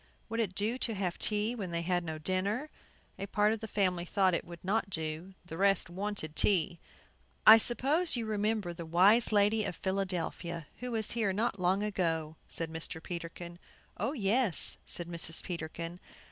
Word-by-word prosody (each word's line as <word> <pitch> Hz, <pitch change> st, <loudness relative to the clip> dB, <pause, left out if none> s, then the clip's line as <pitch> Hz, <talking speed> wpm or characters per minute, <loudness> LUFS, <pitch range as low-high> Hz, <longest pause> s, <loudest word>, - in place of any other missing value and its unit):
Would 225 Hz, +1 st, -3 dB
it 200 Hz, -5 st, -1 dB
do 220 Hz, +6 st, 0 dB
to 225 Hz, -4 st, 0 dB
have 185 Hz, -3 st, -3 dB
tea 210 Hz, +2 st, +2 dB
when 200 Hz, -7 st, -5 dB
they 170 Hz, 0 st, -2 dB
had 180 Hz, +2 st, -1 dB
had 175 Hz, -, -2 dB
no 160 Hz, -2 st, -5 dB
dinner? 195 Hz, -, -2 dB, 0.5 s
A 195 Hz, -, -4 dB
part 210 Hz, +2 st, +2 dB
of 225 Hz, -, -4 dB
the 220 Hz, -, -6 dB
family 185 Hz, -4 st, 0 dB
thought 185 Hz, +1 st, +1 dB
it -, -, 0 dB
would 170 Hz, -1 st, -11 dB
not 200 Hz, +1 st, 0 dB
do; 160 Hz, +2 st, -4 dB
the 165 Hz, -2 st, -8 dB
rest 195 Hz, -3 st, +3 dB
wanted 190 Hz, -4 st, -4 dB
tea. 175 Hz, -4 st, +3 dB, 0.7 s
"I 220 Hz, +1 st, +10 dB
suppose 275 Hz, +10 st, +2 dB
you 235 Hz, -2 st, -2 dB
remember 210 Hz, -3 st, -1 dB
the 170 Hz, 0 st, -7 dB
wise 200 Hz, +9 st, +5 dB
lady 210 Hz, +1 st, +3 dB
of 190 Hz, -, -3 dB
Philadelphia, 180 Hz, -3 st, -3 dB
who 250 Hz, 0 st, -5 dB
was 220 Hz, -2 st, -1 dB
here 220 Hz, -4 st, 0 dB
not 210 Hz, 0 st, -1 dB
long 185 Hz, +3 st, +1 dB
ago," 165 Hz, -6 st, -1 dB
said 165 Hz, -1 st, -3 dB
Mr. 160 Hz, 0 st, -5 dB
Peterkin. 170 Hz, 0 st, -7 dB, 0.4 s
"Oh, 225 Hz, +9 st, -2 dB
yes," 220 Hz, -, +3 dB
said 175 Hz, -, -4 dB
Mrs. 170 Hz, -1 st, +1 dB
Peterkin. 170 Hz, 0 st, -6 dB
190 Hz, 180 wpm, -31 LUFS, 170-215 Hz, 0.7 s, I